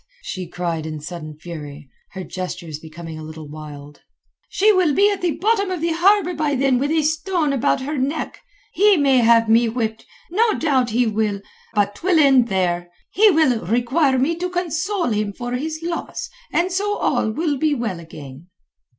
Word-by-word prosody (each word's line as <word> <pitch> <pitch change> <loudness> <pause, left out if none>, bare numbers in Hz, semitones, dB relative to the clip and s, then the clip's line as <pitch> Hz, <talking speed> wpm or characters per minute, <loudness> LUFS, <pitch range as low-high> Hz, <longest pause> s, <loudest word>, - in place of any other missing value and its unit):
she 185 - -5
cried 165 -2 -3
in 155 -1 -5
sudden 155 -1 -8
fury, 150 -3 -9 0.3
her 190 - -6
gestures 170 -3 -6
becoming 160 0 -9
a - - -8
little 155 0 -9
wild. 145 -1 -10 0.5
"She 425 +2 +4
will 355 -7 +2
be 405 +4 +4
at 400 - -3
the 350 -3 -1
bottom 405 0 +1
of 365 -2 -3
the 335 +1 0
harbour 360 +2 +3
by 300 -3 0
then 265 -1 +2
with 285 +2 0
a 315 0 +2
stone 315 0 0
about 275 0 +1
her 285 +2 -3
neck. 285 +5 -3 0.3
He 410 -1 +5
may 275 -3 +4
have 230 -1 +5
me 230 +1 +4
whipped. 225 -1 -3 0.2
No 440 +4 +2
doubt 265 -6 +1
he 240 +3 +2
will. 210 -2 -1 0.3
But 205 -1 +2
'twill 350 - +1
end 270 -5 +5
there. 175 -3 -1 0.2
He 425 +2 +5
will 305 - +2
require 260 - +2
me 275 +6 +1
to 360 +1 -2
console 355 - -1
him 210 -1 -1
for 245 +3 -6
his 310 +6 -3
loss, 335 0 -4 0.2
and 355 +2 +1
so 410 +3 -1
all - - 0
will 295 +5 -1
be 305 0 +2
well 220 -8 -3
again." 150 -2 -11
255 Hz, 185 wpm, -21 LUFS, -, 0.5 s, He